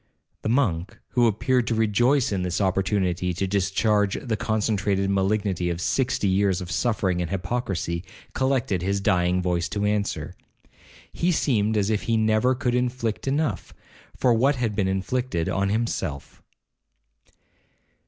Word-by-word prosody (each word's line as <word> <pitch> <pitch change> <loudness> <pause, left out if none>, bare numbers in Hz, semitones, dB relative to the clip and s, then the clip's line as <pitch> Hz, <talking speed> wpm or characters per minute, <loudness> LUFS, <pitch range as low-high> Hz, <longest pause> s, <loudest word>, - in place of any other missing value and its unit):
The - - -2
monk, 110 -6 0
who 120 -1 +3
appeared 125 +3 +1
to 115 - 0
rejoice 120 +5 +2
in 95 -2 -1
this 90 0 -1
opportunity 95 -2 0
to 95 - -1
discharge 100 +1 +1
the 115 -4 -2
concentrated 100 -2 0
malignity 95 -2 0
of 85 -1 -3
sixty 125 +2 0
years 95 -1 +2
of 90 -2 -7
suffering 95 -7 0
and 85 - -3
hypocrisy, 95 -4 -2 0.3
collected 130 -8 0
his 100 +2 0
dying 90 -2 +1
voice 90 0 0
to 105 0 -2
answer. 105 -1 -1 0.8
He 175 +2 +1
seemed 110 -9 +1
as 105 +1 +1
if 105 - 0
he 115 - +3
never 110 +4 +2
could 125 -1 -1
inflict 125 -2 -1
enough, 145 +3 -1 0.4
for 125 -2 +3
what 135 +5 +3
had 115 -5 -2
been 100 -2 +1
inflicted 95 -1 -1
on 100 0 0
himself. 100 -10 -3
105 Hz, 145 wpm, -24 LUFS, 95-120 Hz, 0.8 s, who